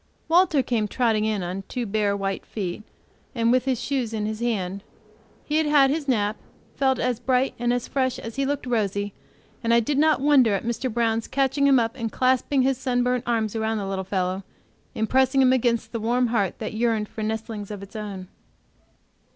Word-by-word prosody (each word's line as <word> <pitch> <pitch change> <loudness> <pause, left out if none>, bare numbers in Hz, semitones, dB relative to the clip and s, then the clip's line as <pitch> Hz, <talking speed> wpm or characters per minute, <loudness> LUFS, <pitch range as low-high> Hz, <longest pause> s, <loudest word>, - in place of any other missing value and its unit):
Walter 335 -4 +4
came 230 -4 0
trotting 220 -2 +1
in 215 -3 -1
on 180 +2 -4
two 245 -2 -3
bare, 205 -1 0
white 195 -1 -3
feet, 195 -2 -5 0.5
and 230 -1 +2
with 255 0 +2
his 260 -3 0
shoes 250 -5 -2
in 210 -1 -2
his 215 0 -3
hand. 200 -5 -2 0.6
He 300 - 0
had 315 -1 +2
had 280 -2 +5
his 300 -1 -2
nap, 215 -4 +1 0.4
felt, 265 -2 +2
as 250 -2 -1
bright; 260 +1 +1
and 240 0 +1
fresh 260 -2 -1
as 225 0 -7
he 275 - 0
looked 280 -1 -2
rosy, 205 -4 -1 0.5
and 230 - +1
I - - +6
did 275 +5 0
not 310 0 +4
wonder 265 -7 +4
at 195 - -4
Mr. 235 +2 -2
Brown's 225 -1 0
catching 275 +1 +1
him 275 -1 +6
up 230 0 0
and 230 -4 -4
clasping 260 +1 +2
his 265 -1 +1
sunburnt 250 -1 0
arms 225 -3 0
about 220 0 -1
the 205 -2 -3
little 195 0 -3
fellow, 185 0 -2 0.5
and 220 - 0
pressing 265 +2 +3
him 255 0 +5
against 240 -2 +1
the 230 - -3
warm 240 +2 +1
heart 205 -5 0
that 215 - -5
yearned 220 -1 0
for 220 - -8
nestlings 220 -1 -4
of 205 -2 -7
its 200 - -13
own. 200 -4 -6
230 Hz, 200 wpm, -24 LUFS, 210-260 Hz, 0.6 s, I